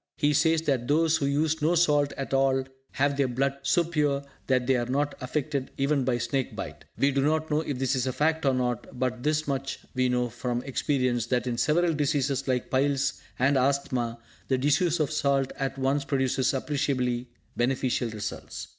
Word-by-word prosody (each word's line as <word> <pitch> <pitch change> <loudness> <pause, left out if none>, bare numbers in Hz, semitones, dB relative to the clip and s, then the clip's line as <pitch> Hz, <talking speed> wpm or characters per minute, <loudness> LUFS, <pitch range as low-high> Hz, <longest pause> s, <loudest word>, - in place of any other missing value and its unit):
He 145 0 +2
says 160 +2 +3
that 130 -6 0
those 160 +2 +3
who 140 -3 -1
use 155 +3 +1
no 160 +4 +3
salt 145 -4 +3
at 135 0 -4
all 135 0 +3 0.3
have 140 +1 +1
their 140 -2 +2
blood 135 +2 -1
so 170 +5 +2
pure 150 -4 0 0.2
that 130 -2 +2
they 135 +1 +3
are 120 -1 -1
not 145 +3 0
affected 140 +1 -2
even 140 0 +1
by 125 -2 +1
snake 120 +2 -2
bite. - - -7
We 140 - +3
do 135 0 +1
not 155 +2 0
know 150 +1 +2
if 145 -4 -3
this 135 +1 0
is 130 0 0
a - - +1
fact 155 +5 +1
or 135 -2 +3
not, 125 0 -2
but 125 -2 -1
this 150 +2 0
much 135 -1 -2 0.2
we 130 -1 +1
know 125 0 +1
from 120 +2 -3
experience, 125 -4 0
that, 125 -1 0
in 120 -1 -2
several 170 +2 +2
diseases 140 -2 0
like 125 -2 -1
piles 135 0 +1 0.2
and 135 +2 +3
asthama, 130 -3 0 0.3
the 130 - +2
disuse 150 +6 +2
of 155 -1 0
salt 140 -3 +1
at 135 -1 -2
once 135 +2 +1
produces 135 -2 +1
appreciably 130 -3 -1 0.3
beneficial 125 -1 0
results. 110 0 -6
135 Hz, 190 wpm, -27 LUFS, 130-145 Hz, 0.3 s, says